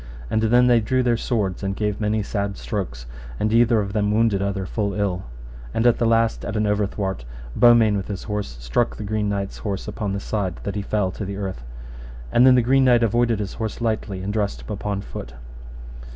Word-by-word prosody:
And 110 - +2
then 120 +3 +4
they 120 -1 +5
drew 130 +4 +1
their 120 -1 +2
swords, 105 -6 -1
and 95 -1 -2
gave 105 0 -2
many 105 0 +1
sad 100 -1 -3
strokes, 85 - -4 0.3
and 110 +1 0
either 115 -1 +4
of 100 -1 -4
them 105 -1 +1
wounded 110 -2 +2
other 100 -1 -2
full 100 +1 -2
ill. 100 -3 -1 0.5
And 115 - +1
at 120 -1 +4
the 115 - +2
last, 115 0 +2
at 110 - -4
an 105 - +1
overthwart, 100 - -1 0.3
Beaumains 115 -3 +5
with 95 - -4
his 100 -3 -5
horse 105 - -4
struck - - 0
the - - -6
Green 105 0 -1
Knight's 100 -1 -3
horse 100 -1 -4
upon 105 -1 -3
the 100 - -2
side, 100 -4 -2
that 100 - -3
he 105 - -2
fell 100 -2 0
to 105 - -6
the 100 0 -5
earth. 95 -10 -4 0.7
And 125 +2 +6
then 130 - +7
the 125 - +4
Green 135 +2 +4
Knight 120 -2 +5
avoided 115 +1 +2
his 100 -2 -4
horse 110 -2 -4
lightly, 110 -4 -2
and 100 +2 -3
dressed 105 -2 -1
him - - -8
upon 100 -1 -3
foot. - - -8
105 Hz, 215 wpm, -23 LUFS, 100-115 Hz, 0.7 s, then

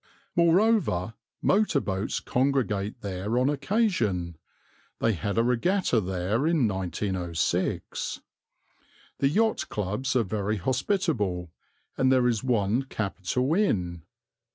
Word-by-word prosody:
Moreover, 170 - +3 0.3
motor 200 -7 +3
boats 95 -3 -2
congregate 125 -5 0
there 100 +3 -2
on 130 +3 +3
occasion 130 - 0 0.6
they 115 - +2
had 100 +3 -3
a 115 - +4
regatta 125 - +2
there 95 - -1
in 160 -8 +3
1906. 95 -3 -2 1.0
The 135 - +3
yacht 220 +8 +1
clubs 105 +7 -2
are 125 - +4
very 105 +1 -2
hospitable, 120 - -1 0.5
and 130 0 +4
there 130 -2 +4
is 115 -2 0
one 115 -2 +1
capital 120 - -1
inn. 90 - 0
115 Hz, 105 wpm, -27 LUFS, 95-140 Hz, 1.0 s, a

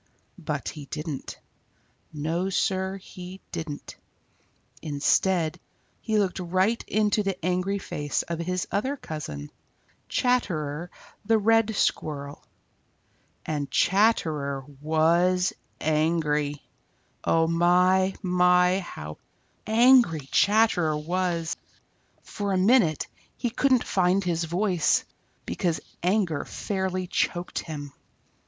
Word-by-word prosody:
But - - -3
he 150 -2 -9
didn't. 150 0 -6 0.7
No, 160 +5 -2
Sir, 190 0 0
he 185 0 -10
didn't. 160 -4 -6 0.8
Instead, 160 +3 +1 0.4
he 220 -2 0
looked 195 -2 0
right 185 +6 +1
into 210 0 +2
the 195 -2 -2
angry 185 +2 0
face 145 -6 -2
of 170 -1 -5
his 180 +1 -2
other 265 +8 -1
cousin, 100 - -6 0.6
Chatterer 175 - 0 0.3
the 225 +2 +3
Red 225 0 +3
Squirrel. 145 -6 -2 1.0
And 145 -3 -2
Chatterer 155 - +2 0.2
was 170 +4 +2 0.3
angry! 150 -2 0 0.6
Oh 165 0 +3
my, 180 +3 +3
my, 180 0 +4
how 75 - -8 0.5
angry 225 - +5
Chatterer 200 -7 +3
was! 170 +1 -1 0.7
For 200 -2 -3
a - - +2
minute 190 - +3 0.3
he 240 - -2
couldn't 255 0 +3
find 185 +1 +2
his 170 -2 0
voice, 180 0 +1 0.4
because 175 -4 -1
his - - -14 0.2
anger 180 -5 +1
fairly 190 -2 -3
choked 175 0 -1
him. 145 -3 -7
180 Hz, 100 wpm, -26 LUFS, 155-195 Hz, 1.0 s, angry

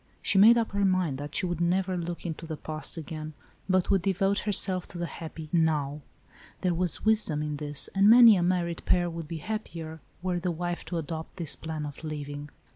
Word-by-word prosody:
She 195 - +3
made 225 +4 +8
up 230 -1 0
her 200 0 0
mind 185 -8 +1
that 145 +1 -6
she - - +1
would 175 -2 -2
never 185 +2 +1
look 175 0 -5
into 165 -1 -5
the 160 -1 -5
past 155 +2 -4
again, 155 -1 -6 0.4
but 185 -1 +2
would 195 -2 +3
devote 195 +2 +1
herself 190 -3 0
to - - -6
the 175 - -2
happy 160 -1 -8
" - - -29 0.2
now." 145 -1 -3 0.6
There 180 -1 +1
was 175 +2 0
wisdom 210 -9 +2
in 150 -1 -3
this, 145 -1 0
and 195 +2 +5
many 230 -1 +9
a 180 - +1
married 175 -1 0
pair 175 -1 +2
would 165 -2 -6
be 165 +1 -5
happier, 165 -4 -6 0.2
were 180 -1 0
the 180 +1 -2
wife 175 +1 -3
to 175 - -4
adopt 160 +1 -6
this 160 -6 -2
plan 155 +2 -5
of 145 +1 -9
living. 145 -1 -6
170 Hz, 210 wpm, -28 LUFS, 155-185 Hz, 0.6 s, many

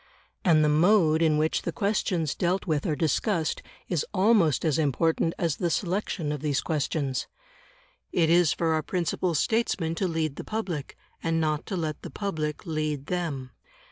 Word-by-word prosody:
And 155 -4 +5
the - - +3
mode 160 +1 +4
in 155 -2 +3
which 155 +1 +1
the - - -3
questions 190 - 0
dealt 180 +2 0
with 155 -4 0
are 155 - +1
discussed 160 - 0 0.3
is 170 -5 0
almost 190 - +3
as 155 -2 +2
important 160 +3 +1
as 165 -5 0
the 175 - 0
selection 180 -3 -1
of 150 -2 -4
these 145 -3 0
questions. 145 -3 -1 0.8
It 165 -2 +3
is 175 -2 +5
for 165 -1 +1
our 155 - +1
principal 175 +1 -1
statesmen 190 -3 +1
to 185 +3 -1
lead 160 -4 -2
the - - -5
public, 185 -10 -4 0.2
and 165 0 0
not 155 -1 -1
to 195 - -2
let 155 -3 -3
the - - -7
public 155 -7 -3
lead 155 -3 -2
them. 150 -8 -3
160 Hz, 170 wpm, -27 LUFS, 150-180 Hz, 0.8 s, And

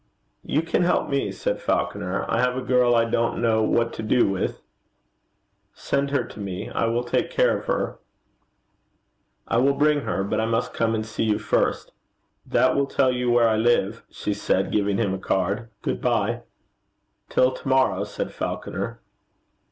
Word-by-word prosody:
'You 155 - 0
can 165 - 0
help 175 0 +1
me,' 140 0 0
said - - -3
Falconer. - - -1
'I 115 - +1
have 125 0 +1
a 130 - -3
girl 125 -1 +3
I 115 0 +4
don't 115 0 0
know 110 -2 +2
what 115 +1 +1
to - - -5
do 115 +3 +3
with.' 95 -1 -2 1.2
'Send 140 0 -1
her 140 -3 +1
to - - -11
me. 95 -2 -5
I 115 - 0
will 120 +1 0
take 120 - 0
care - - +2
of - - -6
her.' - - -2 1.5
'I - - +1
will 135 +3 +4
bring 150 0 +3
her. 95 - -2
But 110 +2 -1
I 110 - 0
must 115 +1 -1
come 115 -1 +1
and 110 0 -2
see 110 +1 -2
you 105 -1 +2
first.' 105 0 0 0.6
'That 130 +2 +3
will 140 0 +1
tell 135 -1 +2
you 125 -1 -1
where 120 -1 +4
I 110 -1 +2
live,' 115 -1 +1
she 105 - -3
said, 95 -1 0
giving 100 -1 +1
him 100 -5 0
a 95 - -3
card. 100 +5 -1
Good - - -2
bye.' - - 0 0.9
'Till 130 0 +3
to 130 - -9
morrow,' 130 0 +2
said - - -5
Falconer. - - -4
115 Hz, 180 wpm, -24 LUFS, 110-130 Hz, 1.5 s, I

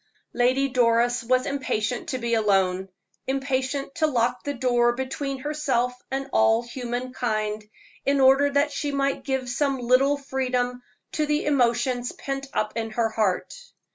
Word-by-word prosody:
Lady 255 +3 +2
Doris 240 -1 +2
was 255 +2 +2
impatient 255 -4 -2
to 260 - -1
be 235 -1 -2
alone 195 -3 +2 0.4
impatient 270 +1 -1
to 310 - +1
lock 245 -4 0
the 285 0 -3
door 240 -1 +2
between 270 +2 -3
herself 265 -4 -1 0.2
and 270 +1 -3
all 225 +1 +4
human 245 +1 -5
kind, 215 -3 -2 0.4
in 280 0 +2
order 270 +2 +5
that 285 +1 +1
she 285 0 -2
might 275 0 -1
give 265 -2 -2
some 275 +2 0
little 255 +3 +3
freedom 250 -3 -2 0.3
to 305 -1 -1
the 300 +1 0
emotions 245 -3 +1
pent 275 0 -5
up 215 0 -1
in 225 -1 -2
her 225 +1 0
heart. 215 -4 0
255 Hz, 150 wpm, -25 LUFS, 235-275 Hz, 0.4 s, order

